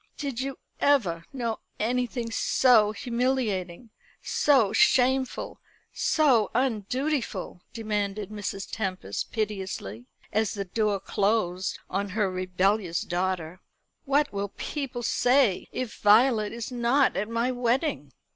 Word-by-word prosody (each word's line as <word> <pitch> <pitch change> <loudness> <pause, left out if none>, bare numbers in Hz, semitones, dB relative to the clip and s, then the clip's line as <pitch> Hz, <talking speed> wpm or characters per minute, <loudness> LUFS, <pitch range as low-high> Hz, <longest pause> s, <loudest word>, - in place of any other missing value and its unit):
"Did 275 -5 -4
you 270 0 -4 0.2
ever 185 -13 +2
know 235 -4 -3 0.2
anything 240 +1 -1
so 225 -3 +4
humiliating, 235 -4 -2 0.3
so 255 -9 +2
shameful, 260 +2 +2 0.3
so 260 -10 +3
undutiful?" 245 - -1
demanded 210 -2 -3
Mrs. 205 -1 -5
Tempest 185 - -3
piteously, 190 - -4 0.3
as 220 0 +1
the 200 -1 -3
door 210 +1 0
closed 195 -2 0
on 200 +1 -2
her 200 -1 0
rebellious 185 0 0
daughter. 180 -1 -2 0.4
"What 285 -1 +2
will 200 0 -2
people 265 -5 -4
say 245 -4 +2
if 255 -4 -4
Violet 215 0 +5
is 235 +1 -6
not 250 +3 +2
at 210 +3 -2
my 230 +2 0
wedding?" 245 - -1
220 Hz, 110 wpm, -27 LUFS, 195-250 Hz, 0.4 s, Violet